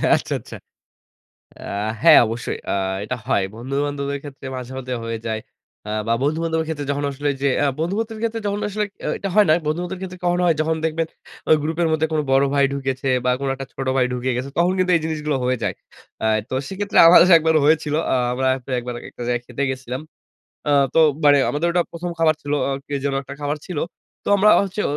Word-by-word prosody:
আচ্ছা, - - -3
আচ্ছা। - - -11 1.1
আ - - -14 0.4
হ্যাঁ। - - +9
অবশ্যই। 115 +2 -4
আ - - +1 0.3
এটা 125 - -3
হয়। 100 - +2
বন্ধুবান্ধবদের 140 +3 -3
ক্ষেত্রে 140 -2 -10
মাঝে, 125 0 -7
মধ্যে 130 -1 -4
হয়ে 115 -1 -3
যায়। 110 -1 -2 0.5
আ - - -5 0.2
বা 115 - +1
বন্ধু 150 +3 +1
বান্ধবের 160 -1 -1
ক্ষেত্রে 145 -3 -4
যখন 145 0 -1
আসলে 145 +1 -3
এইযে 140 +1 0 0.2
আ - - +3
বন্ধু 170 +5 -1
বান্ধবের 225 -1 -3
ক্ষেত্রে 230 0 -1
যখন 205 +1 -1
আসলে 210 +1 -1 0.2
এ - - -1
এটা 195 - -3
হয় 210 -1 +6
না। - - +6
বন্ধুবান্ধবের 175 +4 -2
ক্ষেত্রে 185 -1 -7
কখন 175 0 +2
হয়, 170 -2 +4
যখন 160 +1 +1
দেখবেন 160 0 0 0.4
ওই 155 - +8
গ্রুপের 165 +2 0
মধ্যে 160 0 +2
কোন 155 - +1
বড় 135 +1 +5
ভাই 140 - +4
ঢুকেছে 135 -1 -2 0.2
বা 125 - +3
কোন 140 - -2
একটা 135 0 -7
ছোট 135 - -5
ভাই 125 - +4
ঢুকে 125 +1 -1
গেছে। 130 +2 -4
তখন 175 +2 +3
কিন্তু 185 0 +2
এই - - 0
জিনিসগুলো 150 -3 -1
হয়ে 130 0 +1
যায়। - - -1 0.5
আ - - +3 0.2
তো - - -4
সেক্ষেত্রে 200 +1 -1
আমাদের 180 +1 +8
একবার 160 0 +1
হয়েছিল। 150 0 +2 0.2
আ - - +4 0.2
আমরা 130 +1 0 0.2
তো 135 - -10
একবার 120 0 -5 0.2
একটা 120 - -9
জায়গায় 120 0 -1
খেতে 125 +3 -4
গেছিলাম। 130 0 -5 0.7
আ - - +3 0.2
তো 165 - +4 0.3
মানে 145 -1 +7
আমাদের 155 +4 0
ওটা 175 0 +2
১ম 175 +1 -5
খাবার 155 -1 +4
ছিল। 145 0 -3
আ - - -1 0.2
কে 145 - -3
যেন 140 - 0
একটা 140 - -8
খাবার 145 +1 -1
ছিল। 180 -4 -6 0.5
তো - - -9
আমরা 210 +2 +5
হচ্ছে 200 +2 -3
145 Hz, 215 wpm, -21 LUFS, 130-170 Hz, 1.1 s, হ্যাঁ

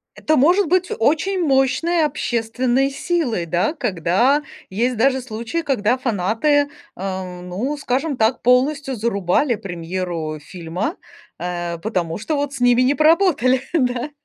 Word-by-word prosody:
Это 310 - +1
может 350 +8 +4
быть 365 +2 +1
очень 325 +10 +1
мощной 290 +4 +2
общественной 255 -1 0
силой, 275 - -1
да, 175 - 0
когда 245 - +1 0.3
есть 235 +6 0
даже 260 +3 +2
случаи, 235 +7 -4
когда 250 -4 +1
фанаты, 250 +6 +1 0.3
эм, 185 -1 -5
ну, 245 +11 -2
скажем 275 +2 -1
так, 225 +1 +1
полностью 270 +2 +2
зарубали 220 +3 +1
премьеру 170 -4 -4
фильма, 180 - -5 0.4
э 175 -1 -3
потому 175 -3 -2
что 305 +7 -2
вот 285 -1 -2
с 275 - -6
ними 245 0 +4
не 260 - +3
поработали, 305 - +3
да. 255 -1 0
250 Hz, 130 wpm, -20 LUFS, 190-285 Hz, 0.4 s, может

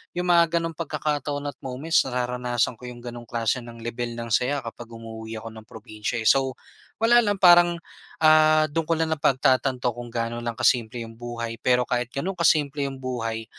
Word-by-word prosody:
Yung 180 0 -2
mga 170 -1 +5
ganong 165 - -3
pagkakataon 150 -2 -2
at - - -11
moments 135 +6 +1
nararanasan 125 -1 -1
ko 125 - -11
yung 120 -1 -9
ganong 120 -1 -8
klase 115 +2 -1
ng 115 -1 -11
lebel 120 0 -4
ng 115 0 -6
saya 135 +5 +1
kapag 115 0 -8
umuuwi 110 0 -8
ako 115 - -7
ng 110 0 -12
probinsiya, 110 +1 -5
eh. - - +1
So 135 -1 +2 0.5
wala 240 +1 +6
lang, 205 -3 +1
parang 175 -2 +6 0.5
ah, 155 0 +6
dun 160 +1 -2
ko 165 - +2
lang 160 0 -1
napagtatanto 130 -3 +1
kung 120 +1 -8
gaano 115 0 -3
lang 120 -1 -4
ka-simple 120 -1 +1
yung 115 0 -12
buhay. 115 -1 -5
pero 125 -1 +2
kahit 125 -1 -1
ganun 170 +8 -2
kasimple 145 -4 +2
yung 135 - -6
buhay, 115 -3 -3
125 Hz, 185 wpm, -24 LUFS, 115-150 Hz, 0.5 s, wala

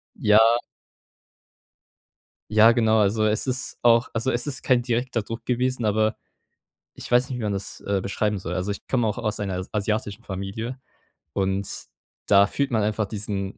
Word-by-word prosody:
Ja. 110 +3 +5 1.9
Ja, 110 +2 +7
genau, 110 -2 +3
also 110 +1 +2
es 110 +4 +1
ist 130 0 -2
auch 115 0 +4
also 120 +4 0
es 120 +2 -2
ist 135 -3 -4
kein 125 -2 +3
direkter 120 -1 -1
Druck 115 +2 -7
gewesen, 125 -1 0
aber, 110 +1 +2 0.8
ich - - -9
weiß 125 +3 +4
nicht, 125 - -4
wie 115 - -5
man 105 - -1
das, 100 0 -5
äh, 100 -1 -1
beschreiben 105 +1 -1
soll. 90 -1 -5
Also, 90 +3 -2
ich 100 - -7
komme 120 -3 +1
auch 105 - -2
aus 105 -2 -2
einer 95 -3 -2
s 95 - -6
asiatischen 105 +1 -2
Familie. 100 +7 -5 0.5
Und 95 0 -1 0.6
da 100 0 +6
fühlt 140 +6 -2
man 110 -3 +1
einfach 105 0 0
diesen 100 -2 -4
110 Hz, 170 wpm, -24 LUFS, 100-120 Hz, 1.9 s, Ja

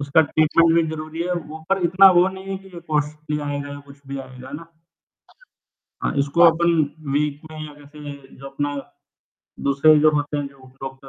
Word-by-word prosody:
उसका 140 +2 +3
ट्रीटमेंट 155 +2 +3
भी 170 - +4
ज़रूरी 155 +1 -5
है, 180 +1 -2
वो 160 -2 -5
पर 195 -1 +1
इतना 190 +3 +7
वो 180 +2 +5
नहीं 190 +1 -10
है 195 - -2
कि - - -13
ये 170 - -8
कॉस्टली 150 0 -1
आएगा 145 0 -4
या 145 0 -7
कुछ 140 0 -15
भी 140 0 -5
आएगा 130 0 -12
ना 165 - -13 1.4
हाँ, - - -1
इसको 140 +4 0
अपन 170 0 +5 0.4
वीक 150 -1 -1
में 155 - -9
या 150 - -12
कैसे 145 0 -10 0.2
जो 135 - -10
अपना 145 +1 -3 0.9
दूसरे 150 +2 +5
जो 155 - +7
होते 145 0 -1
हैं 145 - -2
जो 135 -2 -18 0.2
डॉक्टर, 135 0 -8
150 Hz, 190 wpm, -22 LUFS, 140-165 Hz, 1.4 s, इतना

